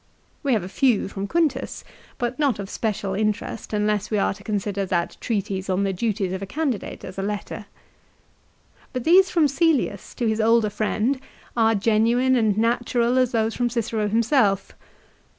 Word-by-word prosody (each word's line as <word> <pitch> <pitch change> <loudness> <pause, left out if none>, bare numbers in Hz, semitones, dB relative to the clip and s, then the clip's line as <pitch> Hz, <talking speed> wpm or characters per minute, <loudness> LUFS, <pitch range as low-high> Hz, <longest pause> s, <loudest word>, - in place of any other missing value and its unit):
We 280 -4 +1
have 215 -5 +1
a - - -5
few 240 +3 +2
from 195 0 -5
Quintus, 305 -2 -1 0.3
but 245 +1 -3
not 280 -7 +2
of 200 -1 -6
special 205 -3 -2
interest 215 +2 -2
unless 210 -1 0
we 215 - 0
are 195 - +1
to - - -15
consider 205 -1 -2
that 175 -2 -1
treatise 195 -4 -2
on 185 +1 +1
the 195 -1 0
duties 195 -2 -1
of 190 - -4
a 195 - -5
candidate 275 -1 -3
as 190 - -7
a - - 0
letter. 205 +1 -4 1.3
But 255 -2 -3
these 370 +5 +6
from 330 -3 +3
Cselius 280 - 0
to 240 - -2
his 220 0 +1
older 225 -1 +3
friend 215 +5 0 0.4
are 225 -1 +3
genuine 230 +5 +3
and 220 -4 +2
natural 240 +2 +1
as 255 -1 +2
those 225 -1 +1
from 245 -1 0
Cicero 225 -2 -1
himself. 220 -2 +2
220 Hz, 170 wpm, -23 LUFS, 200-245 Hz, 1.3 s, these